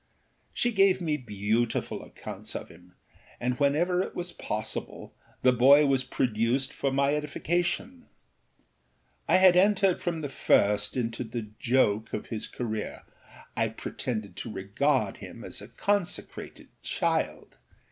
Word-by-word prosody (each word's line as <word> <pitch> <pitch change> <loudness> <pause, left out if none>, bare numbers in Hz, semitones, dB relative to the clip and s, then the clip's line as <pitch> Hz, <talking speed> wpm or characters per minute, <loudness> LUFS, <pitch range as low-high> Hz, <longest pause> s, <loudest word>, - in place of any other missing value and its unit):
She 240 - +1
gave 195 -3 +4
me 160 -4 0
beautiful 110 -2 -1
accounts - - -9
of - - -5
him, 90 +2 -17 0.4
and 125 +2 -1
whenever 165 +6 +2
it - - -5
was 175 0 -4
possible 110 -9 -4 0.3
the 130 - +6
boy 140 +5 +7
was 135 -2 +2
produced 125 +1 0
for 140 - -1
my 140 +1 +2
edification. 175 - -2 1.2
I - - +5
had 185 -1 +7
entered 195 0 +4
from 170 -2 -2
the 145 - -2
first 105 -4 +2
into 115 0 -2
the 115 -2 -6
joke 115 -4 +2
of - - -4
his 110 -2 -4
careerâI 110 -3 -4 0.7
pretended 110 -7 -4
to 115 - -5
regard 105 +3 0
him - - -10
as - - -7
a - - -9
consecrated 200 -3 -3
child. - - -2
130 Hz, 130 wpm, -28 LUFS, 110-175 Hz, 1.2 s, boy